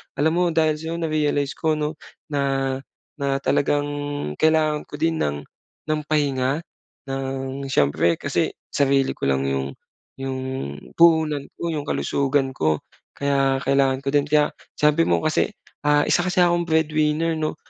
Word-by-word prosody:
alam 150 +3 +2
mo 180 0 +3
dahil 160 -1 +2
sa'yo 160 +1 -4
narealize 150 -3 0
ko 160 -1 +1
'no, 150 +1 -2 0.4
na, 135 -1 0 0.4
na 140 -1 0
talagang 145 +1 +1 0.5
kailangan 155 -1 +3
ko - - -8
din 165 +1 +1
ng 70 0 0 0.5
ng 155 0 0
pahinga, 140 -2 +1 0.5
ng 135 0 -4
siyempre 85 - +3
kasi - - 0 0.2
sarili 135 -1 +2
ko - - -13
lang 70 0 +1
yung 70 0 -1 0.5
yung 135 -1 -3 0.6
puhunan 160 -4 +4 0.2
ko, 170 - -2
yung 150 -2 -2
kalusugan 135 -1 0
ko. 80 -1 +1 0.4
Kaya 135 -1 +1
kailangan 135 -1 +2
ko - - -9
din, 145 0 +3
kaya 150 0 +4 0.3
sabi 150 +2 +3
mo - - +3
kasi 155 0 +1 0.3
ah, 145 0 +4
isa 175 - +3
kasi 180 0 0
akong 175 0 +2
breadwinner 160 0 +1
'no, 155 0 -1
145 Hz, 145 wpm, -23 LUFS, 135-155 Hz, 0.6 s, puhunan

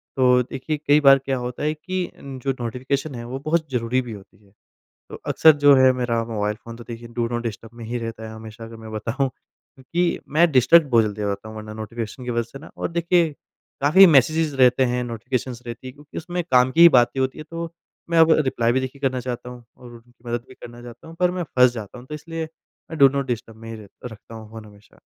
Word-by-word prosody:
तो, 125 -1 +4
देखिए 135 +5 -4
कई 145 +1 +6
बार 135 -1 +7
क्या 135 0 -2
होता 125 +3 -5
है 155 +1 +1
कि 185 +3 -4
जो 135 -1 -4
नोटिफ़िकेशन 130 +4 -3
है, 120 - -6
वो 130 +3 -5
बहुत 160 0 +1
ज़रूरी 125 +1 0
भी 120 - -8
होती 100 +1 -15
है। 100 - -25 0.6
तो - - -10
अक्सर 160 - +6
जो 145 -1 +9
है 130 0 +6
मेरा 120 -2 -1
मोबाइल 105 -2 -2
फ़ोन 115 0 -9
तो 120 - -11
देखिए 115 0 -8
डू 120 -1 0
नॉट 120 0 -2
डिस्टर्ब 115 -1 -6
में 115 - -8
ही 120 +2 -3
रहता 115 -1 -6
है 110 - -9
हमेशा 110 0 -10
अगर 115 0 -10
मैं 110 -1 -10
बताऊँ, 115 +6 -1
क्योंकि 170 +7 -4 0.2
मैं 170 +1 +5
डिस्ट्रैक्ट 135 +6 +6
बहुत 115 -4 +4
जल्दी 105 0 -4
हो 105 - -1
जाता 100 +2 -4
हूँ 110 - -9
वरना 110 0 -8
नोटिफ़िकेशन 115 +3 -6
की 125 - -3
वजह 120 0 0
से 135 - -8
ना। 160 - -13
और - - -3
देखिए, 170 -1 +2 0.5
काफ़ी 170 +8 +7
मेसेजेज़ 155 0 +3
रहते 130 0 +4
हैं, 125 0 -1
नोटिफ़िकेशंस 120 +1 -4
रहती 120 +2 -8
है, 130 - -7
क्योंकि 145 +1 -10
उसमें 175 +2 -3
काम 125 0 +5
की 165 - +1
ही 170 - +11
बातें 120 +2 +1
होती 130 +3 -1
है, 155 - -7
तो 165 0 -5 0.4
मैं 165 - +3
अब 160 0 +6
रिप्लाई 120 -3 +1
भी 130 - +1
देखिए 130 +1 -6
करना 130 -2 0
चाहता 125 0 -5
हूँ 125 -1 -12
और 125 -1 -13
उनकी 120 +1 -18
मदद 120 0 -3
भी 130 - -13
करना 120 0 -12
चाहता 120 +6 -12
हूँ 165 - -11
पर 180 - +3
मैं 180 0 -3
फँस 125 -1 +6
जाता 115 0 -8
हूँ, 125 - -13
तो 150 - -7
इसलिए 160 +1 -6 0.4
मैं 160 - -6
डू 140 - +8
नॉट 140 0 -2
डिस्टर्ब 115 -2 -5
में 115 0 -11
ही 115 - -6
रह 105 -2 -12 0.2
रखता 110 +1 -13
हूँ 110 -1 -10
फ़ोन 110 -1 -10
हमेशा। 105 0 -19
125 Hz, 245 wpm, -22 LUFS, 115-140 Hz, 0.6 s, ही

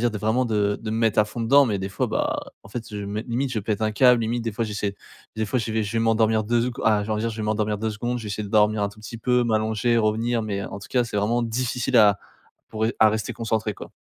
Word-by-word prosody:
dire 120 - +3
de 105 - -5
vraiment 110 +5 +1
de 105 -2 0
de 110 - -5
me 110 - -1
mettre 115 -2 +1
à 105 - +6
fond 115 +2 -7
dedans 140 +4 +5
mais 105 -4 -1
des 95 +1 -4
fois, - - -1
bah - - -1 0.2
en 100 - -14
fait 120 0 -5
je 105 - -6
me 105 +2 -3
limite 125 +3 -2
je 110 - -1
pète 105 +1 -2
un 110 0 +1
câble, 125 0 +5
limite 115 +1 -1
des 115 -2 -3
fois 115 +2 -1
j'essaie 105 -2 -3 0.4
des 110 - 0
fois 125 - 0
je 115 -1 -3
vais 110 0 +1
je 105 +2 -4
vais 115 - 0
m'endormir 110 -1 +2
2 115 +2 +1
secon 125 -1 -3
ah 105 -2 +3
genre 110 0 -2
on - - -1
va 105 - -2
dire 115 - 0
je 110 - -8
vais 110 - -4
m'endormir 105 0 0
2 110 0 -1
secondes, 120 +3 -3
je - - -8
vais - - -5
essayer 105 +1 -3
de 100 - -7
dormir 105 0 +3
un 100 - +1
tout 100 +1 -15
petit 115 +1 -8
peu, 125 +1 +2
m'allonger, 110 +1 +1
revenir, 115 +2 +1
mais 100 -2 -3
en 100 - -7
tout - - -11
cas 125 -2 +2
c'est 115 - -5
vraiment 115 +4 +1
difficile 120 +1 -1
à 105 -2 +6 0.5
pour 110 0 -5
ré 115 - +1
à 110 -1 +7
rester 110 0 -2
concentré 110 -2 -2
quoi. - - -10
110 Hz, 305 wpm, -24 LUFS, 105-115 Hz, 0.5 s, à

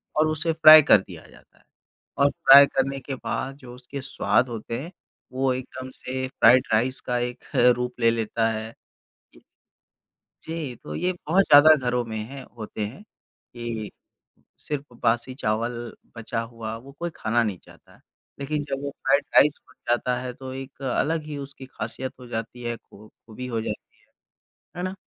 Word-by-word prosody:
और 155 +1 +3
उसे 155 +1 0
फ्राई 155 -1 +10
कर 135 - +7
दिया 85 -4 -12
जाता - - -21
है। - - -27 0.5
और 140 0 +4
फ्राई 140 +1 +8
करने 135 0 -1
के 135 0 -6
बाद 135 +1 -4
जो 125 -4 -12
उसके 130 +2 -8
स्वाद 130 -1 +1
होते 115 0 -5
हैं 165 +5 -8 0.4
वो 130 0 +1
एकदम 130 0 -7
से 130 0 -4
फ्राइड 130 -1 +5
राइस 125 +4 +1
का 125 -1 -2
एक 120 0 -4 0.3
रूप 125 0 -4
ले 115 0 +5
लेता 115 0 0
है। 110 +1 -5 1.7
जी, 160 -6 -5
तो - - -9
ये 180 +1 0
बहुत 180 +2 +1
ज़्यादा 150 0 +8
घरों 125 0 +1
में 110 -1 -6
हैं 135 -1 -8
होते 110 -1 -8
हैं 125 - -11
कि, 120 - -9 0.7
सिर्फ़ 145 -4 -6
बासी 120 +3 +1
चावल 115 -1 -1 0.4
बचा 115 0 -3
हुआ 115 -1 -6
वो 130 +4 -13
कोई 170 0 -2
खाना 115 +2 +1
नहीं 105 -5 -2
चाहता। - - -19 0.4
लेकिन 145 +2 -2
जब 135 0 -3
वो 140 - -2
फ्राइड 140 +1 +1
राइस 150 0 +5
बन 130 - -20 0.2
जाता 125 +1 +1
है 125 0 -5
तो 130 0 -8
एक 135 +1 -9 0.2
अलग 160 +2 0
ही 150 -2 -6
उसकी 140 -1 -9
ख़ासियत 120 +1 -5
हो 125 - -11
जाती 115 +1 -6
है 120 -1 -3
खू 105 -1 -17 0.2
खूबी 115 +3 -8
हो 115 -3 -2
जाती 105 -1 -7
है, - - -31 0.7
है 175 - -3
ना? 185 +1 -3
130 Hz, 175 wpm, -24 LUFS, 115-140 Hz, 1.7 s, फ्राई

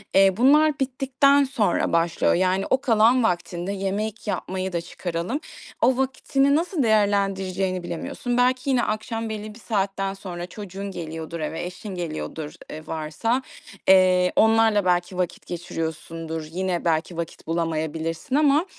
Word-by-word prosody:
eee, 195 -1 +5
bunlar 295 +4 +5
bittikten 270 +1 +3
sonra 240 -13 0
başlıyor. 165 0 +2
Yani, 185 +2 +1
o 260 - +2
kalan 235 0 +4
vaktinde 175 -1 -1
yemek 200 +3 -3
yapmayı 190 -2 -3
da 170 - 0
çıkaralım. 175 - -4 0.4
O 250 +2 +4
vaktini 270 +1 +1
nasıl 335 -1 0
değerlendireceğini 195 -3 +1 0.2
bilemiyorsun. 240 +8 -3
Belki 255 +2 +2
yine 250 -3 +3
akşam 225 +1 -2
belli 215 +1 -6
saatten 195 -3 -1
sonra 180 -3 -6
çocuğun 195 +1 -7
geliyordur 165 -1 -6
eve, 160 +2 -3
eşin 185 +3 -7
geliyordur, 160 -2 -5 0.2
eee, 155 +1 -8
varsa, 160 +11 -1 0.5
eee, 185 -1 +5
onlarla 220 -2 +4
belki 180 0 +1
vakit 180 -2 -2
geçiriyorsundur, 165 -1 -5
yine 180 0 -2
belki 165 +1 0
vakit 170 -1 -6
bulamayabilirsin 165 - -2
ama, 295 +2 +4
195 Hz, 130 wpm, -24 LUFS, 170-230 Hz, 0.5 s, eee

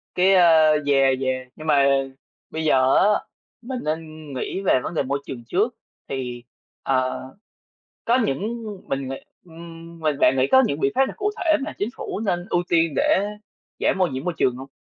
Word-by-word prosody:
Cái 190 +2 +4
a 165 -3 +6 0.2
yeah, 135 -2 +3
yeah, 130 -1 -2
nhưng 155 +1 -9
mà 140 -2 +4 0.6
bây 160 - -4
giờ 130 -3 +4
á, - - +5 0.6
mình 255 +1 -5
nên 155 -2 -5
nghĩ 185 +9 -3
về 185 - +3
vấn - - -4
đề 150 - 0
môi 140 +2 -2
trường 120 -3 -7
trước, 215 - 0 0.3
thì, 125 -3 -5 0.4
ờ, 130 -1 0 0.8
có 240 +2 +3
những 220 - -3 0.2
mình 135 -1 -2
nghĩ, 135 - -3 0.3
ừm, 165 0 -12
mình 155 -3 0
bạn 135 - +4
nghĩ 130 - +3
có 260 0 +7
những 140 - -2
biện 135 -2 +1
pháp 270 +1 +4
nào - - -6
cụ 415 0 -1
thể 315 -2 +2
mà 310 - -6
chính 205 - -2
phủ - - -5
nên 180 -5 -1
ưu 175 - +1
tiên 165 -3 +2
để 195 - +2 0.5
giảm - - +1
ô 185 - +4
nhiễm 130 -2 -5
môi 180 0 -2
trường 125 - +2
hông? 135 +2 -9
155 Hz, 195 wpm, -23 LUFS, 135-185 Hz, 0.8 s, có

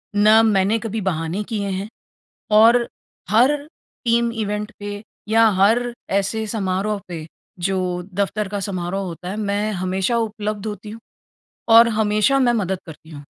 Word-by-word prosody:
ना 215 +2 +6
मैंने 205 0 +2
कभी 225 0 -4
बहाने 175 +2 -2
किए 205 -3 -2
हैं, 190 +2 -3 0.6
और 230 +3 +5 0.4
हर 250 +7 +4 0.5
टीम 235 0 +2
इवेंट 210 -1 -3
पे 205 0 -6 0.3
या 225 +1 +5
हर 240 +4 +3 0.2
ऐसे 200 +3 0
समारोह 205 -1 -2
पे 160 -3 -6 0.3
जो 180 -1 -1
दफ़्तर 200 +1 -1
का 205 0 -4
समारोह 190 0 -3
होता 180 +1 -7
है 205 - -4
मैं 210 0 -1
हमेशा 190 +4 -1
उपलब्ध 215 -2 -3
होती 210 0 -6
हूँ 225 - -9 0.7
और 230 +1 +9
हमेशा 215 +4 +2
मैं 245 -3 +3
मदद 190 -4 -1
करती 160 0 -12
हूँ। 145 -2 -9
210 Hz, 150 wpm, -21 LUFS, 190-220 Hz, 0.7 s, और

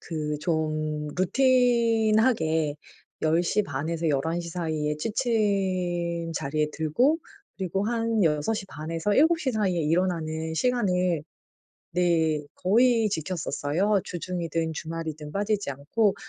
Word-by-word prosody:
그 150 -2 -3
좀 155 -2 -1
루틴하게 225 - +3 0.5
10:30 160 -2 +1
에서 165 -1 -1
11:00 160 +4 -1
사이에 155 -3 -2
취침 185 -6 0
자리에 150 +1 0
들고 240 - +2 0.4
그리고 190 +1 -2
한 230 -3 +1
6:30 155 0 -1
에서 165 +5 0
7:00 315 -2 +3
사이에 190 -6 +1
일어나는 160 -1 0
시간을 180 - +1 0.7
네 165 -3 +2
거의 225 +3 +3
지켰었어요. 175 +3 0
주중이든 165 -2 -3
주말이든 160 -1 -5
빠지지 205 -4 -1
않고. 180 +10 +1
170 Hz, 205 characters per minute, -26 LUFS, 155-210 Hz, 0.7 s, 루틴하게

